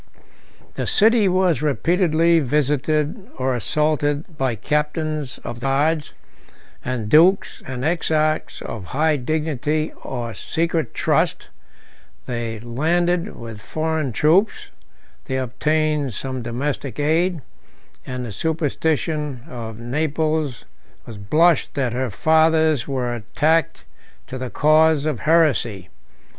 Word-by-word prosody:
The - - -3
city 220 0 +4
was 180 -6 +2
repeatedly 165 - +2
visited 150 - 0
or 130 0 0
assaulted 150 - 0
by 130 -4 -1
captains 150 - -2
of 120 - -6
the 130 - -3
guards, 150 +3 +1 0.7
and 120 -4 -3
dukes 175 - +4
and 130 0 -4
exarchs 155 -2 0
of 105 -5 -6
high 155 0 +3
dignity 155 +2 -1
or 120 -4 -4
secret 165 -3 -2
trust; - - 0 0.8
they 115 -2 -4
landed 170 - 0
with 115 -3 -9
foreign 155 +2 -2
troops, 170 - +2 0.5
they 130 - -2
obtained 150 +1 0
some 130 +2 -4
domestic 130 +4 -3
aid, 160 +2 +1 0.6
and 125 -1 -5
the 115 - -6
superstition 155 - -1
of 115 -6 -7
Naples 150 +2 -1 0.4
may 115 - -7
blush 155 +10 +3
that 130 -5 0
her 130 0 -1
fathers 160 +2 +3
were 125 -3 -2
attached 150 +8 0 0.4
to 130 - -7
the 130 -1 -4
cause 155 +1 +3
of 150 -7 -1
heresy. 130 - +2
150 Hz, 110 wpm, -21 LUFS, 125-160 Hz, 0.8 s, city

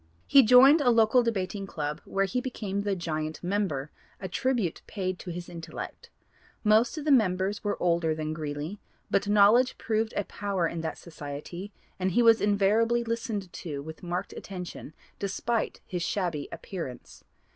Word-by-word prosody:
He 275 - +7
joined 260 +6 +7
a 255 - +4
local 230 +1 +5
debating 200 -3 -2
club 150 -2 -4
where 195 0 0
he 250 +6 -1
became 210 -6 -3
the 200 -1 0
'giant' 155 -3 -4
member, 175 -7 -1 0.3
a 190 - -4
tribute 225 -2 -1
paid 185 -3 -3
to - - -8
his 175 0 -6
intellect. 165 -2 -8 0.5
Most 220 +7 +4
of 305 - -5
the 305 - +3
members 200 -4 +2
were 205 -1 -1
older 170 -2 +1
than 155 0 -3
Greeley, 155 +5 -5 0.3
but 200 - +2
knowledge 210 +5 +5
proved 220 0 -1
a 205 - +1
power 195 -4 -1
in 165 0 -4
that 160 -1 -4
society 160 +5 -8 0.3
and 185 -1 0
he 240 - +4
was 230 -1 +6
invariably 210 +4 +3
listened 225 -5 -3
to 145 -5 -5
with 160 +1 -9
marked 175 0 -3
attention 180 -5 -8 0.2
despite 215 +3 -2
his 180 -3 -4
shabby 170 -4 -2
appearance. 165 -10 -7
195 Hz, 160 wpm, -28 LUFS, 170-220 Hz, 0.5 s, He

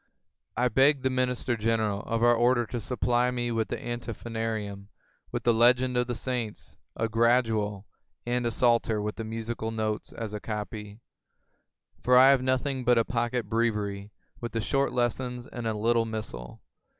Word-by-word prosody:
I 125 +2 +3
beg 135 +3 +3
the 130 - +1
Minister 125 -1 0
General 110 -2 0
of 115 +1 -2
our 120 0 +6
Order 120 +1 +3
to 120 +2 -4
supply 125 +1 +1
me 120 -1 -2
with 115 -1 0
the - - -3
Antiphonarium, 115 -4 -4 0.4
with - - -3
the 120 - +4
legends 125 +2 +4
of 125 - 0
the 120 - -2
saints, 120 -3 -4 0.2
a 115 - 0
Gradual, 115 -3 +1 0.4
and 120 0 0
a - - +2
Psalter 115 -2 +2
with 105 0 -3
the 115 - -4
musical 110 0 -4
notes 110 -1 -3
as 110 -2 -6
a 105 - -3
copy; 105 0 -6 1.0
for 125 0 +5
I 130 +2 +8
have 135 -2 +3
nothing 130 +1 0
but 120 0 +4
a 115 - +3
pocket 120 -3 -1
Breviary 105 -3 -1 0.3
with 120 0 -5
the 115 - 0
short 135 +5 +1
lessons 125 0 -1
and 120 -3 -6
a 110 - 0
little 115 +2 +2
missal. 110 - -6
115 Hz, 170 wpm, -28 LUFS, 110-125 Hz, 1.0 s, I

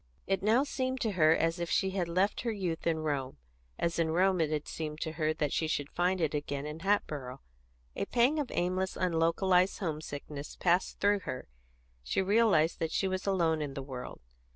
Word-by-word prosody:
It 195 0 0
now 220 +6 +4
seemed 260 -2 -2
to 220 - +1
her 160 -4 +5
as 165 +1 0
if 170 0 -2
she 190 - +1
had 185 -3 -1
left 185 +4 +1
her 235 - -1
youth 180 -6 -3
in 160 -1 +1
Rome, 140 - -2 0.4
as 170 0 -1
in 165 -1 +2
Rome 180 +2 +3
it 155 - +1
had 150 -1 -2
seemed 155 -1 -5
to 160 - -2
her 155 -1 0
that 150 -2 -1
she 160 - 0
should 145 -2 -2
find 180 +2 +1
it 160 -3 0
again 145 -1 -3
in 150 +1 -6
Hatboro'. 150 -9 -1 0.6
A - - -1
pang 250 +6 +2
of 280 -4 -2
aimless, 185 +2 -1
unlocalised 180 +2 +2
homesickness 150 -3 -5
passed 180 +1 +1
through 205 0 +3
her; 130 -8 -6 0.5
she - - -1
realised 195 -5 +3
that 160 -1 -1
she 195 - +1
was 185 +1 -3
alone 165 -5 +2
in 145 -2 -4
the 135 - -4
world. 130 -2 -7
170 Hz, 200 wpm, -31 LUFS, 155-190 Hz, 0.6 s, her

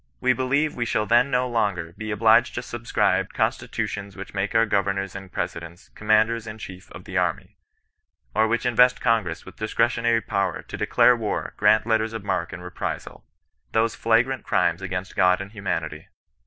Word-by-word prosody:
We 130 0 +3
be 130 - -4
lieve 140 +4 +1
we 120 - -2
shall 110 -2 0
then 120 +4 +4
no 125 -1 +1
longer 100 -8 -1
be 110 0 -6
obliged 115 +3 +4
to 120 - -3
subscribe 120 -1 0
Constitutions 100 -1 -2
which 100 - -8
make 100 +2 -2
our 115 0 +5
governors 100 -2 -1
and 95 -1 -8
presidents 85 +1 -6
^^commanders 110 +1 +2
in 110 0 -7
chief 95 -3 -10
of 90 - -10
the 95 0 -5
armyy^ 90 -3 -1 0.8
or 110 +1 +3
which 115 +1 -1
invest 125 +1 +4
Congress 105 -9 0
with 95 - -13
discretionary 115 +1 +1
power 100 -3 -2
"to - - -8
declare 125 - +4
war, 110 -3 -3
grant 110 0 +4
letters 110 -1 +1
of 115 -3 -5
marque 90 -4 -2
and 90 - -8
reprisal" 90 - -6 0.2
— - - -48
those 115 0 +1
flh.grant 120 +3 +1
crimes 90 - +1
against 90 0 -5
God 90 0 +4
and 100 +1 -7
humanity. 85 -7 -4
110 Hz, 180 wpm, -24 LUFS, 95-115 Hz, 0.8 s, our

